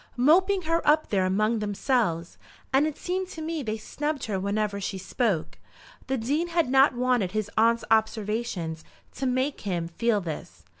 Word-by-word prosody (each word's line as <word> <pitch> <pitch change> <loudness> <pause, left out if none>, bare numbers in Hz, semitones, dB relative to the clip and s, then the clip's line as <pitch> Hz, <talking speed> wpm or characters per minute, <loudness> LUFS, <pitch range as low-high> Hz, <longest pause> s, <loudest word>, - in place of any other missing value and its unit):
"Moping 370 +9 +4
her 330 +1 +1
up 310 +1 +4
there 190 -2 +2
among 215 +4 +1
themselves; 205 -5 -1 0.3
and 280 +3 +4
it 310 - -5
seemed 370 +1 -2
to 345 - -9
me 320 0 -3
they 220 -4 -3
snubbed 295 +6 -3
her 200 -4 -2
whenever 200 +1 -1
she 195 0 -3
spoke." 185 -4 -1 0.5
The 265 0 0
Dean 285 +9 0
had 335 -6 +1
not 270 0 +5
wanted 245 -6 +1
his 215 -1 -2
aunt's 230 +1 +3
observation 215 -6 0 0.4
to 265 - -2
make 260 +3 0
him 175 -5 -2
feel 215 +5 +1
this. 165 -5 -7
230 Hz, 165 wpm, -26 LUFS, 200-290 Hz, 0.5 s, not